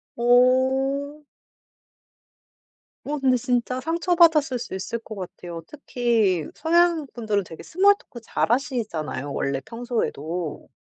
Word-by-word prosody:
어. 265 Hz, +4 st, +2 dB, 1.8 s
어 300 Hz, +1 st, -2 dB
근데 260 Hz, -2 st, +3 dB
진짜 250 Hz, +1 st, -1 dB
상처 335 Hz, +5 st, 0 dB
받았을 305 Hz, -7 st, +4 dB
수 225 Hz, -, -7 dB
있을 225 Hz, +5 st, -4 dB
것 220 Hz, -1 st, -9 dB
같아요. 175 Hz, -3 st, -7 dB
특히 230 Hz, -, 0 dB
서양 335 Hz, -1 st, +2 dB
분들은 215 Hz, -4 st, -1 dB
되게 165 Hz, -, -10 dB
small 400 Hz, +4 st, +4 dB
talk 235 Hz, -, -13 dB
잘 220 Hz, -, -1 dB
하시잖아요 215 Hz, -, -2 dB
원래 140 Hz, 0 st, -2 dB
평소에도. 180 Hz, -, -4 dB
245 Hz, 265 characters per minute, -24 LUFS, 200-285 Hz, 1.8 s, 받았을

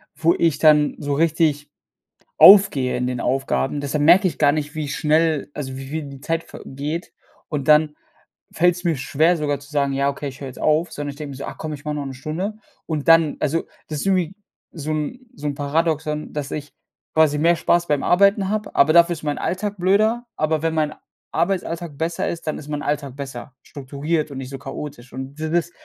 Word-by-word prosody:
wo 165 Hz, +1 st, +3 dB
ich 165 Hz, -4 st, +1 dB
dann 150 Hz, -2 st, +4 dB
so 145 Hz, -1 st, -3 dB
richtig 150 Hz, -2 st, +1 dB, 0.7 s
aufgehe 195 Hz, -11 st, +7 dB
in 125 Hz, 0 st, -1 dB
den 125 Hz, -1 st, -3 dB
Aufgaben. 135 Hz, +2 st, 0 dB
Deshalb 145 Hz, +1 st, -1 dB
merke 180 Hz, +5 st, +6 dB
ich 160 Hz, -, -4 dB
gar 145 Hz, -2 st, +4 dB
nicht, 150 Hz, 0 st, -3 dB
wie 155 Hz, -2 st, -3 dB
schnell, 155 Hz, -1 st, +1 dB
also 130 Hz, -3 st, -5 dB
wie 135 Hz, 0 st, -8 dB
wie 160 Hz, 0 st, -3 dB
die 140 Hz, -1 st, -10 dB
Zeit 165 Hz, +3 st, -2 dB
vergeht, 150 Hz, +6 st, -6 dB, 0.3 s
und 150 Hz, -1 st, -3 dB
dann 150 Hz, 0 st, +5 dB, 0.6 s
fällt's 175 Hz, +1 st, +2 dB
mir 165 Hz, -4 st, +1 dB
schwer, 155 Hz, +6 st, +2 dB
sogar 145 Hz, -2 st, -1 dB
zu 140 Hz, -, -15 dB
sagen: 140 Hz, -2 st, 0 dB
„Ja, 140 Hz, +1 st, +1 dB
okay, 140 Hz, 0 st, -3 dB
ich 130 Hz, -, -10 dB
hör 135 Hz, -, -6 dB
jetzt 130 Hz, -, -9 dB
auf“, 155 Hz, +2 st, +1 dB
sondern 145 Hz, 0 st, -4 dB
ich 140 Hz, -, -10 dB
denk 150 Hz, -1 st, -7 dB
mir 135 Hz, -, -8 dB
so: 140 Hz, -, -7 dB
„Ach -, -, -7 dB
komm, 155 Hz, -1 st, -5 dB
ich 145 Hz, -, -11 dB
mache 150 Hz, 0 st, -2 dB
noch 140 Hz, -1 st, -4 dB
'ne 135 Hz, -, -6 dB
Stunde“. 160 Hz, +10 st, -4 dB, 0.3 s
Und 155 Hz, -3 st, -3 dB
dann 165 Hz, -2 st, +5 dB
also, 155 Hz, +3 st, 0 dB, 0.2 s
das 155 Hz, -2 st, -4 dB
ist -, -, -4 dB
irgendwie 185 Hz, -2 st, +1 dB, 0.4 s
so 155 Hz, -2 st, -6 dB
'n 155 Hz, -, -3 dB
so 150 Hz, -, -7 dB
'n 145 Hz, -, -1 dB
Paradoxon, 150 Hz, +1 st, -1 dB
dass 145 Hz, -2 st, -4 dB
ich 150 Hz, -1 st, -6 dB, 0.4 s
quasi 155 Hz, -2 st, +4 dB
mehr 170 Hz, +2 st, +4 dB
Spaß 175 Hz, +1 st, +2 dB
beim 145 Hz, -2 st, +1 dB
Arbeiten 200 Hz, +1 st, +3 dB
habe, 215 Hz, 0 st, -3 dB
aber 150 Hz, +3 st, +5 dB
dafür 170 Hz, 0 st, +6 dB
ist 160 Hz, -, -6 dB
mein 150 Hz, -1 st, -2 dB
Alltag 205 Hz, +3 st, -2 dB
blöder. 215 Hz, +6 st, +2 dB
Aber 155 Hz, 0 st, 0 dB
wenn 165 Hz, -, 0 dB
mein 155 Hz, -1 st, 0 dB, 0.4 s
Arbeitsalltag 170 Hz, -4 st, -2 dB
besser 165 Hz, +1 st, -1 dB
ist, 170 Hz, -1 st, -5 dB
dann 155 Hz, -, -1 dB
ist 150 Hz, -, -11 dB
mein 150 Hz, 0 st, -3 dB
Alltag 140 Hz, -3 st, -3 dB
besser. 135 Hz, -2 st, -8 dB
Strukturiert 145 Hz, +3 st, -3 dB
und 135 Hz, -, -7 dB
nicht 130 Hz, -1 st, -6 dB
so 135 Hz, -, -6 dB
chaotisch. 135 Hz, -2 st, -8 dB
Und 135 Hz, +1 st, -7 dB
d 155 Hz, 0 st, -3 dB
das 170 Hz, 0 st, 0 dB
150 Hz, 215 wpm, -21 LUFS, 140-165 Hz, 0.7 s, aufgehe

